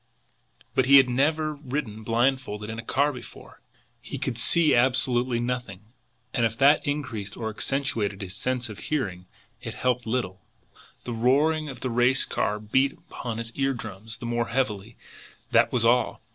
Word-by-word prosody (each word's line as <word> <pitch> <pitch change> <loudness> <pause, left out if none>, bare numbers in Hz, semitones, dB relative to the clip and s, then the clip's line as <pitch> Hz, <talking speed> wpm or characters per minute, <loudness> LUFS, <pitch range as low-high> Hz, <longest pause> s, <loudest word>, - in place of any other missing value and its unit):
But 130 - +2
he 140 +1 +9
had 135 -1 +6
never 155 +5 +1
ridden 135 -6 -5
blindfolded 115 -2 0
in 115 - -6
a - - -6
car 140 +5 +1
before! 125 - -12 0.4
He - - -6
could 130 - -2
see 165 +6 +4
absolutely 125 -1 +3
nothing. 120 -6 -3 0.5
And 120 - +1
if 115 0 0
that 145 +4 +4
increased 115 -9 -3
or 110 -2 -3
accentuated 110 -5 -1
his 95 -1 -7
sense 125 +2 -2
of 105 -3 -9
hearing, 95 -12 -3 0.3
it - - -6
helped 125 -2 0
little 105 -6 -2 0.6
the 120 - -4
roar 135 +7 +3 0.2
of 135 - -9
the 130 - -2
racing 125 +2 +2
car 105 0 0
beat 130 +6 +1
upon 115 -2 -7
his 115 0 -4
eardrums 115 -5 -3
the - - -8
more 120 0 -1
heavily, 110 -3 -2 0.5
that 115 0 +4
was 120 -3 +2
all. 125 +2 +2
120 Hz, 160 wpm, -26 LUFS, 110-135 Hz, 0.6 s, he